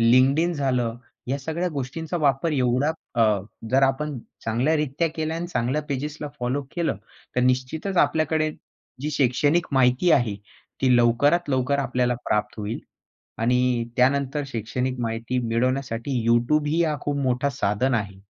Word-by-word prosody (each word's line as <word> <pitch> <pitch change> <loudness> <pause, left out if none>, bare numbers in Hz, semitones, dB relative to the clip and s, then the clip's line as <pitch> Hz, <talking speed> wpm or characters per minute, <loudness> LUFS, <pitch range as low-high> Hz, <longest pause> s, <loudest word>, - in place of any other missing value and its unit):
LinkedIn 130 +9 +4
झालं 125 -5 0 0.3
या 140 - 0
सगळ्या 160 +6 -2
गोष्टींचा 150 +6 -3
वापर 145 +2 +1
एवढा 130 +2 +2 0.2
अ, 115 - +3 0.5
जर 135 +2 +4
आपण 135 +1 +1 0.3
चांगल्यारित्या 150 +6 +1
केल्या 160 +1 -2
आणि 175 +1 -3
चांगल्या 145 -2 -1
पेजेसला 150 +2 -3
फॉलो 130 +4 -1
केलं, 165 - 0 0.4
तर - - +4
निश्चितच 130 +9 0
आपल्याकडे 155 +1 +2 0.5
जी 150 +2 -2
शैक्षणिक 145 +5 +2
माहिती 130 +6 +3
आहे 120 -6 +3 0.5
ती 130 -2 +4
लवकरात 145 +8 +3
लवकर 130 +1 +1
आपल्याला 125 -2 +1
प्राप्त 105 0 0
होईल. 105 +3 -3 0.6
आणि 125 0 +2
त्यानंतर 140 +3 +2
शैक्षणिक 125 +1 -3
माहिती 115 +2 -2
मिळवण्यासाठी 125 +2 -1 0.2
YouTubeही 150 +7 +3
हा 155 -2 0
खूप 145 -1 -2
मोठा 130 +2 +1
साधन 125 0 0
आहे. 100 -4 -3
135 Hz, 135 wpm, -24 LUFS, 125-150 Hz, 0.6 s, LinkedIn